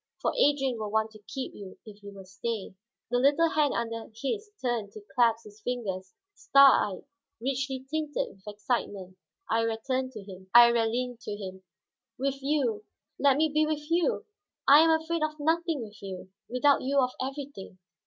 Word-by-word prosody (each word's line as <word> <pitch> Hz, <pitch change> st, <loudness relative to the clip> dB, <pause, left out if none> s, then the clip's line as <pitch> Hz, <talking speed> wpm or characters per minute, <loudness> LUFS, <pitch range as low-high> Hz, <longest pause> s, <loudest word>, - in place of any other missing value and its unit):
For -, -, 0 dB
Adrian 275 Hz, -, +2 dB
will 215 Hz, -1 st, -3 dB
want 220 Hz, +1 st, 0 dB
to 215 Hz, -1 st, -15 dB
keep 265 Hz, -2 st, -5 dB
you, 195 Hz, -2 st, -10 dB
if 210 Hz, -1 st, -13 dB
you 200 Hz, 0 st, -10 dB
will 195 Hz, -1 st, -11 dB
stay." 195 Hz, +2 st, -5 dB, 0.4 s
The 245 Hz, -, +2 dB
little 290 Hz, +5 st, +4 dB
hand 295 Hz, -2 st, +2 dB
under 230 Hz, -1 st, -4 dB
his 415 Hz, -, -3 dB
turned 235 Hz, -5 st, -2 dB
to 215 Hz, -, -10 dB
clasp 230 Hz, -2 st, +3 dB
his 210 Hz, 0 st, -15 dB
fingers; 195 Hz, -6 st, -4 dB, 0.2 s
star 345 Hz, -9 st, +6 dB
eyed, -, -, -13 dB, 0.4 s
richly 265 Hz, +1 st, -2 dB
tinted 305 Hz, 0 st, -2 dB
with 195 Hz, +1 st, -25 dB
excitement, 205 Hz, -3 st, -3 dB, 0.4 s
Iría 225 Hz, 0 st, +1 dB, 1.1 s
leaned 245 Hz, +1 st, -3 dB
to 210 Hz, -3 st, -5 dB
him. 190 Hz, -2 st, -8 dB, 0.5 s
"With 275 Hz, +1 st, -2 dB
you, 265 Hz, -7 st, 0 dB, 0.4 s
let 280 Hz, -1 st, +4 dB
me 310 Hz, 0 st, +2 dB
be 305 Hz, 0 st, +3 dB
with 305 Hz, 0 st, -3 dB
you. 350 Hz, +8 st, +1 dB, 0.4 s
I 285 Hz, +2 st, +9 dB
am 325 Hz, +1 st, +6 dB
afraid 320 Hz, +1 st, +1 dB
of 310 Hz, 0 st, -2 dB
nothing 325 Hz, -2 st, 0 dB
with 210 Hz, -2 st, -12 dB
you, 185 Hz, -1 st, -8 dB, 0.2 s
without 275 Hz, +3 st, +3 dB
you 275 Hz, +2 st, -1 dB
of 255 Hz, -1 st, +2 dB
everything. 270 Hz, -8 st, -6 dB
250 Hz, 165 wpm, -28 LUFS, 210-290 Hz, 1.1 s, I